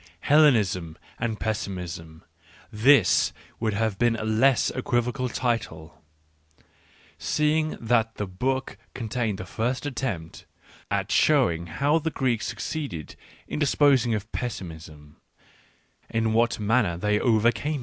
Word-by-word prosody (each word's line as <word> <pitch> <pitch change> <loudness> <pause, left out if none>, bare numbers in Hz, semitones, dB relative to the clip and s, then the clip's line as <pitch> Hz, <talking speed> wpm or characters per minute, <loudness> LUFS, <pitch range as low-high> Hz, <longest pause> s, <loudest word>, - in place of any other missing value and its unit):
" - - -39
Hellenism 105 - +3 0.2
and 115 -2 -2
Pessimism 90 -7 -5 0.2
" 80 +2 -28
— - - -29
this 140 -10 +5 0.3
would 110 -2 -1
have 110 -2 -1
been 120 -1 +3
a 110 - -4
less 115 +4 +3
equivocal 125 +1 -1
title, 100 -11 -3 1.2
seeing 155 - 0
that 115 -1 +1
the 105 - -3
book 130 +9 -2 0.2
contains 115 -3 -2
the 95 - -7
first 120 +8 -2
attempt 120 - -4 0.4
at - - -1
showing 85 0 +3
ho 140 - +1
wjhs 160 0 -3
Gregk 125 -4 0
^su - - -4 0.3
cceeded 80 -3 -8 0.3
in - - -4
disposing^ 135 -5 +3
of 105 +1 -6
pessimism 80 - -7 0.3
— - - -31
* - - -27
n 115 -1 0
what 115 +1 +2
manner 105 -4 +1
they 105 +3 +1
overcame 120 +6 +2
it. - - -3
115 Hz, 140 wpm, -25 LUFS, 95-125 Hz, 1.2 s, this